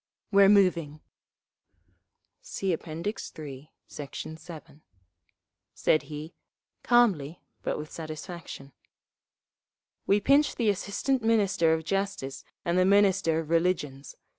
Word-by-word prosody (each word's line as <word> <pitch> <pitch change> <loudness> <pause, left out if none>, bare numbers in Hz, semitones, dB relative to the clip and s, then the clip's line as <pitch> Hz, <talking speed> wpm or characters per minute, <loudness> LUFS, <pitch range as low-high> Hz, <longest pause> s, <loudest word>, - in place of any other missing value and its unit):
"We're 200 -1 +6
moving!" 175 -7 +3 1.4
(See 195 - -2
App. 165 - -5
III, 155 -5 -6 0.2
Sect. 145 -2 -8 0.2
7) 160 -2 -12 0.9
said 155 - +2
he, 155 +2 -8 0.5
calmly 185 - +2 0.2
but - - -2
with 150 0 -7
satisfaction. 155 -3 -8 1.4
"We 200 - +4
pinched 280 +7 +3
the 230 -3 +2
Assistant 225 +7 -1
Minister 205 -7 +2
of 160 - -5
Justice 195 -8 -3 0.2
and 175 +1 +2
the - - +5
Minister 195 -4 +3
of 160 0 -9
Religions. 165 -5 0
170 Hz, 105 wpm, -28 LUFS, 155-200 Hz, 1.4 s, We're